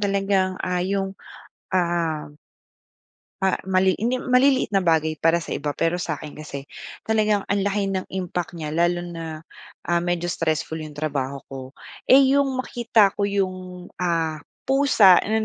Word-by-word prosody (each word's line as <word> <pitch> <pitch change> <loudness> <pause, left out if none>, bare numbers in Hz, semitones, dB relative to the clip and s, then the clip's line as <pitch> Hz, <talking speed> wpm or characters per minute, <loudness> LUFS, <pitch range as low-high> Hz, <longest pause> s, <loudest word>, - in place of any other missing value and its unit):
talagang, 195 -2 +1
ah, 180 -1 -1
'yong 195 +1 -1 0.6
ah 170 -4 0 1.2
ah, 190 -1 +2
mali 190 0 +2
hindi 250 +4 -1
maliliit 255 0 +3
na 200 - +3
bagay 160 -2 +1
para 165 +2 +2
sa - - -9
iba 145 0 -3
pero 165 +2 0
sa 170 -3 -2
akin 150 0 -10
kasi 145 -2 -7 0.4
talagang 215 -2 +1
ang 200 - +2
laki 205 0 0
ng 190 -1 -2
impact 180 -2 -3
niya 155 -3 -5
lalo 175 +2 +1
na, 170 -1 -7 0.7
ah, 175 - +3
medyo 175 0 -1
stressful 160 -1 -2
'yong 155 -1 -8
trabaho 140 -2 -3
ko. 135 -1 -6 0.5
Eh, 265 0 +6
'yong 275 -1 +2
makikita 235 -5 +3
ko 200 - +2
'yong, 185 -2 -3
ah, 165 -3 0 0.3
pusa 265 -9 +5
na 220 +1 0
180 Hz, 150 wpm, -23 LUFS, 165-200 Hz, 1.2 s, Eh